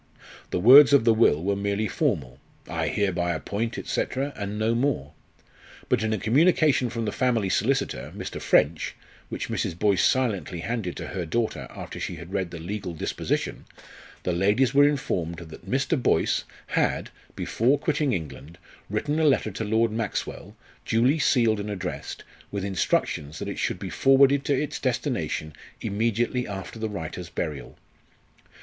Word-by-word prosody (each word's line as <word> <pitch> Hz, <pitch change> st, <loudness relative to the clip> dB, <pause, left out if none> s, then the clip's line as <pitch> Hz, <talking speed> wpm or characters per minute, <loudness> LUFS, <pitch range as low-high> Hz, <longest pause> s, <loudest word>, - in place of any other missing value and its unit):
The -, -, -1 dB
words 135 Hz, +8 st, +9 dB
of 140 Hz, -5 st, +5 dB
the 115 Hz, -, +6 dB
will 85 Hz, -9 st, +3 dB
were 100 Hz, +1 st, +1 dB
merely 100 Hz, +2 st, -1 dB
formal: 65 Hz, -8 st, -1 dB, 0.3 s
"I -, -, -2 dB
hereby 90 Hz, -4 st, 0 dB
appoint," 110 Hz, +8 st, -3 dB
&c., -, -, 0 dB, 0.3 s
and 105 Hz, 0 st, -4 dB
no 110 Hz, +2 st, +1 dB
more; 115 Hz, -, 0 dB, 0.8 s
but -, -, +2 dB
in 110 Hz, 0 st, 0 dB
a 110 Hz, -, +1 dB
communication 145 Hz, +1 st, +3 dB
from 115 Hz, -1 st, -3 dB
the 105 Hz, -, -1 dB
family 115 Hz, -6 st, +1 dB
solicitor, 135 Hz, +9 st, 0 dB
Mr. -, -, -6 dB
French, 80 Hz, +2 st, +2 dB, 0.3 s
which -, -, -4 dB
Mrs. 80 Hz, -, -2 dB
Boyce 100 Hz, -2 st, +2 dB
silently 100 Hz, -9 st, +1 dB
handed 110 Hz, -4 st, -3 dB
to -, -, -6 dB
her 90 Hz, -4 st, -4 dB
daughter 110 Hz, +7 st, -1 dB
after -, -, -8 dB
she -, -, -4 dB
had 85 Hz, +3 st, -10 dB
read 95 Hz, -3 st, -1 dB
the 85 Hz, -, -7 dB
legal 90 Hz, +1 st, -5 dB
disposition, -, -, -2 dB, 0.6 s
the 90 Hz, -, 0 dB
ladies 105 Hz, +9 st, +2 dB
were 145 Hz, +1 st, +6 dB
informed 85 Hz, -, -2 dB
that 80 Hz, -2 st, -11 dB
Mr. 135 Hz, +2 st, +1 dB
Boyce -, -, +2 dB, 0.2 s
had, -, -, 0 dB, 0.2 s
before 130 Hz, +6 st, +1 dB
quitting 150 Hz, -2 st, 0 dB
England, 80 Hz, -, -5 dB, 0.3 s
written 145 Hz, +10 st, -1 dB
a -, -, +2 dB
letter 135 Hz, -7 st, +3 dB
to 105 Hz, -, -4 dB
Lord 110 Hz, +1 st, +2 dB
Maxwell, 110 Hz, -2 st, -4 dB, 0.3 s
duly 125 Hz, +7 st, +2 dB
sealed 115 Hz, -6 st, +3 dB
and 100 Hz, +1 st, -4 dB
addressed, 100 Hz, -3 st, -5 dB, 0.3 s
with 100 Hz, -1 st, -3 dB
instructions 80 Hz, -5 st, -1 dB
that -, -, -5 dB
it -, -, -4 dB
should -, -, -1 dB
be -, -, -6 dB
forwarded 135 Hz, +1 st, +4 dB
to 140 Hz, -3 st, +2 dB
its 150 Hz, -, -3 dB
destination 75 Hz, 0 st, -2 dB, 0.3 s
immediately 115 Hz, +3 st, 0 dB
after 95 Hz, +2 st, -7 dB
the 110 Hz, 0 st, -2 dB
writer's 90 Hz, -2 st, -6 dB
burial. 75 Hz, -5 st, -5 dB
105 Hz, 160 wpm, -26 LUFS, 90-125 Hz, 0.8 s, words